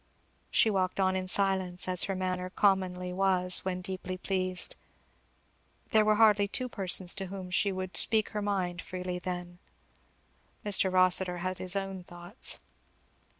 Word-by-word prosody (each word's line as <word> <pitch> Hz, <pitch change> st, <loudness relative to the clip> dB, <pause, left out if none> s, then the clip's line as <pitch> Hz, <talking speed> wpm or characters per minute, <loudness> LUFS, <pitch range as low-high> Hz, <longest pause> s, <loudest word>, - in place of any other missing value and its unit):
She 220 Hz, -, +2 dB
walked 185 Hz, -1 st, -2 dB
on 190 Hz, -1 st, +1 dB
in 185 Hz, 0 st, -3 dB
silence, 190 Hz, -2 st, +1 dB
as 180 Hz, -1 st, +3 dB
her 195 Hz, -, -4 dB
manner 185 Hz, 0 st, -3 dB
commonly 185 Hz, -2 st, 0 dB
was 185 Hz, -1 st, +3 dB
when 185 Hz, -1 st, -4 dB
deeply 185 Hz, 0 st, -6 dB
pleased; 185 Hz, -1 st, -2 dB, 1.2 s
there 215 Hz, -1 st, +4 dB
were 215 Hz, 0 st, +2 dB
hardly 210 Hz, -2 st, +4 dB
two 250 Hz, +5 st, -2 dB
persons 190 Hz, -5 st, +3 dB
to 195 Hz, -1 st, -6 dB
whom 185 Hz, -1 st, -8 dB
she 200 Hz, +2 st, +1 dB
would 185 Hz, -1 st, -6 dB
speak 220 Hz, -1 st, +3 dB
her 210 Hz, -, -5 dB
mind 185 Hz, -3 st, -3 dB
freely 180 Hz, 0 st, -6 dB
then. 175 Hz, -1 st, -7 dB, 1.1 s
Mr. 195 Hz, -2 st, +2 dB
Kossitur 185 Hz, -1 st, +4 dB
had 185 Hz, 0 st, -4 dB
his 185 Hz, +1 st, -1 dB
own 195 Hz, -2 st, -5 dB
thoughts. 175 Hz, +6 st, -5 dB
185 Hz, 150 wpm, -29 LUFS, 180-195 Hz, 1.2 s, there